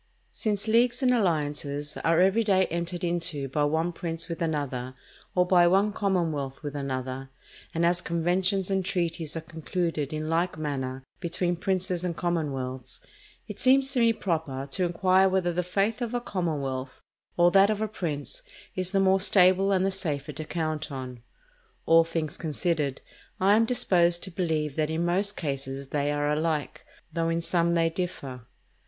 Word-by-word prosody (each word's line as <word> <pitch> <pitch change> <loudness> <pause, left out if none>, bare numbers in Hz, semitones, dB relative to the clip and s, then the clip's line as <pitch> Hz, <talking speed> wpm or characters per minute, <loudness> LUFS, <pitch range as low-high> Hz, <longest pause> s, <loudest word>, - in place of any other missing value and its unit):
Since 210 -1 -2
leagues 240 +4 +3
and 250 -1 +4
alliances 145 -7 -1
are 165 0 +2
every 195 +5 +4
day 190 -3 +3
entered 170 +1 -3
into 170 -5 -1
by 145 +3 0
one 160 +4 0
prince 165 -1 -4
with 165 0 -5
another, 135 -6 -2 0.4
or 180 0 +4
by 180 -1 +5
one 195 +4 +3
commonwealth 165 -10 -1
with 145 -1 -5
another, 130 -1 -4 0.4
and 165 +1 +1
as 175 +1 +2
conventions 180 +3 0
and 190 -1 +1
treaties 170 -4 -2
are - - -3
concluded 160 -2 -3
in 155 0 -3
like 165 +2 0
manner 135 -4 -3 0.2
between 175 0 -1
princes 180 0 -1
and 175 -2 -2
commonwealths, 135 -7 -3 0.5
it - - -8
seems 270 +1 +4
to 265 - 0
me 230 -1 +5
proper 160 -10 -2
to 180 +5 +1
inquire 185 +2 +3
whether 185 -2 +1
the 180 - 0
faith 195 +6 -1
of 240 0 -2
a - - +1
commonwealth 140 - -3 0.4
or 175 0 +5
that 195 +2 +6
of 215 -1 0
a 220 - 0
prince 170 - -5 0.3
is 185 +1 -2
the 195 - +3
more 190 0 +4
stable 190 0 +5
and 190 -1 +2
the 195 - +1
safer 150 -7 -3
to 155 +2 -6
count 155 -2 -3
on. 130 -3 -6 0.6
All 165 0 +6
things 165 -2 -3
considered, 155 -3 -1 0.4
I 195 +2 +5
am 225 +1 +4
disposed 175 -7 +2
to 190 - -4
believe 160 -5 -1
that 155 -1 +1
in 160 +2 -1
most 195 +4 +1
cases 135 -2 -4
they 145 0 0
are 145 0 0
alike, 150 0 -1 0.3
though 165 -1 0
in 165 0 0
some 170 0 +1
they 165 -1 +2
differ. 135 -9 -5
170 Hz, 170 wpm, -27 LUFS, 150-190 Hz, 0.6 s, that